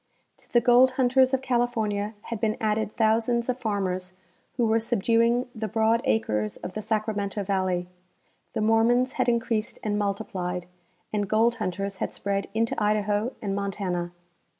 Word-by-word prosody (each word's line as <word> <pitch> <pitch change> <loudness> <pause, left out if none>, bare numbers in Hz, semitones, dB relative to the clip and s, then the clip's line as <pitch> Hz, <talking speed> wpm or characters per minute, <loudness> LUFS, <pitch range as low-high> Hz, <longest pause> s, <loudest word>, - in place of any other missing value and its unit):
To - - -17
the 240 - +4
gold 245 +2 +5
hunters 260 0 +3
of 265 -1 0
California 225 -4 0
had 230 - -5
been 220 -1 +1
added 215 -1 -1
thousands 230 +2 +2
of 255 0 -1
farmers 185 -5 -2 0.4
who 240 - +3
were 225 0 +3
subduing 230 +2 +2
the 220 -1 -4
broad 225 +2 +2
acres 105 -1 0
of 180 - -7
the 215 - -4
Sacramento 210 -2 -1
valley. 185 -2 0 0.7
The - - -1
Mormons 235 +4 +3
had - - +1
increased 230 -2 -1
and 210 -1 0
multiplied, 195 -3 -3 0.5
and 205 -2 -1
gold 230 +2 +3
hunters 195 -1 -3
had - - -3
spread 200 0 -2
into 225 0 +1
Idaho 210 +2 +1
and 195 -1 -1
Montana. 190 -3 -2
215 Hz, 150 wpm, -26 LUFS, 200-235 Hz, 0.7 s, gold